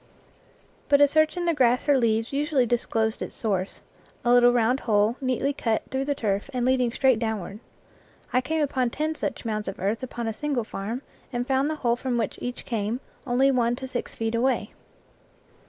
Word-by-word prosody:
But 285 Hz, -1 st, +6 dB
a 290 Hz, -, +7 dB
search 310 Hz, +3 st, +2 dB
in 350 Hz, -, -1 dB
the 340 Hz, -, +2 dB
grass 250 Hz, -3 st, +2 dB
or 290 Hz, -, +5 dB
leaves 225 Hz, -1 st, +1 dB
usually 285 Hz, -2 st, +2 dB
disclosed 225 Hz, -2 st, 0 dB
its -, -, -5 dB
source 195 Hz, -4 st, -2 dB, 0.4 s
a 240 Hz, -, +4 dB
little 245 Hz, 0 st, +7 dB
round 245 Hz, +2 st, +2 dB
hole 210 Hz, +1 st, +2 dB
neatly 265 Hz, +2 st, 0 dB
cut 225 Hz, -5 st, -1 dB
through 265 Hz, 0 st, -1 dB
the 285 Hz, 0 st, 0 dB
turf 205 Hz, 0 st, -1 dB
and 245 Hz, -1 st, 0 dB
leading 255 Hz, -2 st, +2 dB
straight 260 Hz, -2 st, +3 dB
downward. 215 Hz, -3 st, -3 dB, 0.7 s
I 255 Hz, -, +4 dB
came 310 Hz, +4 st, 0 dB
upon 260 Hz, -3 st, 0 dB
ten 310 Hz, +5 st, -2 dB
such 310 Hz, -, -4 dB
mounds 215 Hz, -2 st, -2 dB
of 195 Hz, -, -4 dB
earth 200 Hz, +4 st, -1 dB
upon 240 Hz, -2 st, -5 dB
a 225 Hz, -, -1 dB
single 280 Hz, -1 st, -1 dB
farm, 220 Hz, +5 st, -5 dB, 0.3 s
and 245 Hz, -1 st, -2 dB
found 270 Hz, +2 st, +1 dB
the 310 Hz, -, -1 dB
hole 235 Hz, 0 st, +4 dB
from 245 Hz, 0 st, -2 dB
which 235 Hz, -, -2 dB
each 245 Hz, 0 st, -5 dB
came, 225 Hz, +1 st, -2 dB, 0.2 s
from 265 Hz, +1 st, +3 dB
one 240 Hz, -1 st, +2 dB
to 265 Hz, +1 st, -6 dB
six 250 Hz, -1 st, -5 dB
feet 225 Hz, 0 st, -2 dB
away. 255 Hz, +3 st, 0 dB
245 Hz, 195 wpm, -25 LUFS, 225-270 Hz, 0.7 s, a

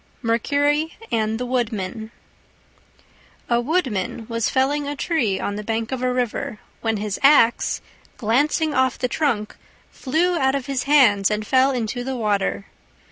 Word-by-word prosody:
MERCURY 290 Hz, +7 st, +1 dB
AND 220 Hz, 0 st, 0 dB
THE 250 Hz, -, -2 dB
WOODMAN 220 Hz, -4 st, -2 dB, 1.4 s
A 235 Hz, 0 st, +3 dB
Woodman 240 Hz, -, -1 dB
was 230 Hz, -1 st, -1 dB
felling 280 Hz, +2 st, +1 dB
a 290 Hz, -, -3 dB
tree 265 Hz, -, 0 dB
on 205 Hz, -, -3 dB
the 210 Hz, -, -5 dB
bank 225 Hz, +2 st, -2 dB
of 260 Hz, -1 st, -3 dB
a 255 Hz, 0 st, +1 dB
river, 245 Hz, -3 st, -2 dB, 0.2 s
when 225 Hz, -1 st, 0 dB
his 205 Hz, -1 st, -3 dB
axe, 270 Hz, -4 st, +4 dB, 0.4 s
glancing 290 Hz, +7 st, +1 dB
off 260 Hz, -2 st, +1 dB
the 250 Hz, -, -1 dB
trunk, 245 Hz, -6 st, -1 dB, 0.4 s
flew 335 Hz, +6 st, 0 dB
out 265 Hz, 0 st, +2 dB
of 275 Hz, -3 st, -3 dB
his 270 Hz, -2 st, -2 dB
hands 240 Hz, -9 st, +5 dB
and 210 Hz, 0 st, -2 dB
fell 260 Hz, +4 st, +4 dB
into 245 Hz, -2 st, -2 dB
the 265 Hz, +1 st, -3 dB
water. 200 Hz, -, -1 dB
245 Hz, 150 wpm, -22 LUFS, 220-275 Hz, 1.4 s, hands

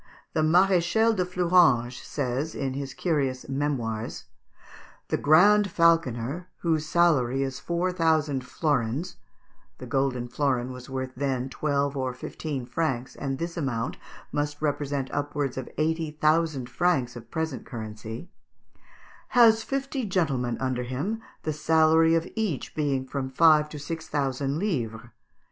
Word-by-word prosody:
The 155 Hz, -, +1 dB
Maréchal 185 Hz, +6 st, +4 dB
de 185 Hz, -, +1 dB
Fleuranges 175 Hz, -9 st, +3 dB
says, 140 Hz, +3 st, -3 dB
in 135 Hz, -2 st, -2 dB
his 135 Hz, -1 st, -5 dB
curious 140 Hz, -7 st, -1 dB
"Memoirs" 130 Hz, -6 st, -2 dB, 0.9 s
"The -, -, +1 dB
Grand 200 Hz, +7 st, +5 dB
Falconer, 165 Hz, -2 st, +2 dB
whose 160 Hz, -2 st, 0 dB
salary 140 Hz, -7 st, +3 dB
is 135 Hz, 0 st, -4 dB
four 170 Hz, +6 st, -1 dB
thousand 155 Hz, -6 st, +1 dB
florins" 145 Hz, +4 st, -1 dB, 0.6 s
(the 130 Hz, -, -8 dB
golden 125 Hz, -1 st, 0 dB
florin 130 Hz, -1 st, 0 dB
was 125 Hz, +1 st, -9 dB
worth 130 Hz, -1 st, -3 dB
then 130 Hz, -1 st, -1 dB
twelve 140 Hz, 0 st, -1 dB
or 130 Hz, -2 st, -2 dB
fifteen 135 Hz, 0 st, -5 dB
francs, 130 Hz, -4 st, -2 dB
and 135 Hz, -1 st, -3 dB
this 170 Hz, +3 st, -4 dB
amount 135 Hz, -5 st, -2 dB, 0.3 s
must 145 Hz, 0 st, -2 dB
represent 145 Hz, -2 st, -2 dB
upwards 145 Hz, -2 st, -2 dB
of 130 Hz, -, -5 dB
eighty 160 Hz, +1 st, 0 dB
thousand 155 Hz, -3 st, +1 dB
francs 130 Hz, -3 st, +1 dB
of 115 Hz, -1 st, -10 dB
present 160 Hz, -1 st, -3 dB
currency), 110 Hz, +4 st, -7 dB, 1.1 s
"has 225 Hz, -2 st, +7 dB
fifty 275 Hz, +2 st, -3 dB
gentlemen 140 Hz, -, 0 dB
under 130 Hz, -1 st, -1 dB
him, 145 Hz, -, -3 dB, 0.2 s
the 155 Hz, -, -1 dB
salary 160 Hz, +1 st, +4 dB
of 165 Hz, +1 st, 0 dB
each 210 Hz, -, -2 dB
being 140 Hz, -4 st, 0 dB
from 130 Hz, 0 st, -4 dB
five 150 Hz, +2 st, +5 dB
to 150 Hz, -, -8 dB
six 160 Hz, +2 st, -6 dB
thousand 140 Hz, -1 st, -1 dB
livres. 125 Hz, -, -2 dB
145 Hz, 135 wpm, -26 LUFS, 130-165 Hz, 1.1 s, has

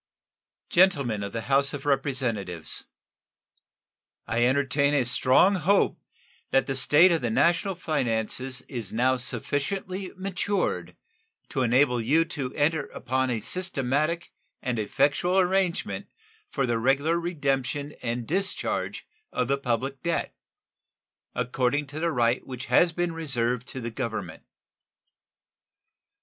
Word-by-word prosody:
Gentlemen 140 Hz, -, +3 dB
of 100 Hz, 0 st, -4 dB
the 115 Hz, -, -3 dB
House 140 Hz, +3 st, +2 dB
of 140 Hz, -, -8 dB
Representatives: 125 Hz, -, -1 dB, 1.4 s
I 120 Hz, +1 st, +1 dB
entertain 140 Hz, +2 st, +2 dB
a 135 Hz, -4 st, +2 dB
strong 130 Hz, +10 st, +4 dB
hope 195 Hz, +4 st, +2 dB, 0.5 s
that 135 Hz, -1 st, +3 dB
the 135 Hz, -, -2 dB
state 150 Hz, +7 st, +5 dB
of 165 Hz, -, +1 dB
the 120 Hz, -, -1 dB
national 170 Hz, -, +2 dB
finances 130 Hz, -5 st, -1 dB
is 115 Hz, -8 st, -6 dB
now 130 Hz, +3 st, +2 dB
sufficiently 185 Hz, -, -3 dB
matured 190 Hz, -, -2 dB, 0.5 s
to -, -, -1 dB
enable 125 Hz, 0 st, +3 dB
you 155 Hz, +8 st, +3 dB
to 145 Hz, -6 st, -4 dB
enter 150 Hz, 0 st, +1 dB
upon 130 Hz, +1 st, -1 dB
a 115 Hz, -3 st, -1 dB
systematic 155 Hz, -, 0 dB, 0.3 s
and 125 Hz, -3 st, -2 dB
effectual 145 Hz, -, +1 dB
arrangement 185 Hz, -1 st, +1 dB, 0.4 s
for 135 Hz, -, -1 dB
the 120 Hz, -2 st, 0 dB
regular 140 Hz, +7 st, +2 dB
redemption 145 Hz, -3 st, -2 dB
and 120 Hz, 0 st, -3 dB
discharge 190 Hz, +4 st, -1 dB, 0.3 s
of 125 Hz, -, -1 dB
the 140 Hz, -, +2 dB
public 135 Hz, +1 st, -2 dB
debt, 170 Hz, -1 st, -2 dB, 1.0 s
according 125 Hz, +3 st, 0 dB
to 145 Hz, +2 st, -7 dB
the 170 Hz, +1 st, 0 dB
right 120 Hz, -2 st, +1 dB
which 130 Hz, -1 st, -6 dB
has 165 Hz, +8 st, +4 dB
been 175 Hz, +1 st, -2 dB
reserved 125 Hz, -6 st, -1 dB
to 130 Hz, -, -5 dB
the 115 Hz, -1 st, -4 dB
Government. 110 Hz, -9 st, -4 dB
135 Hz, 125 wpm, -26 LUFS, 125-165 Hz, 1.4 s, state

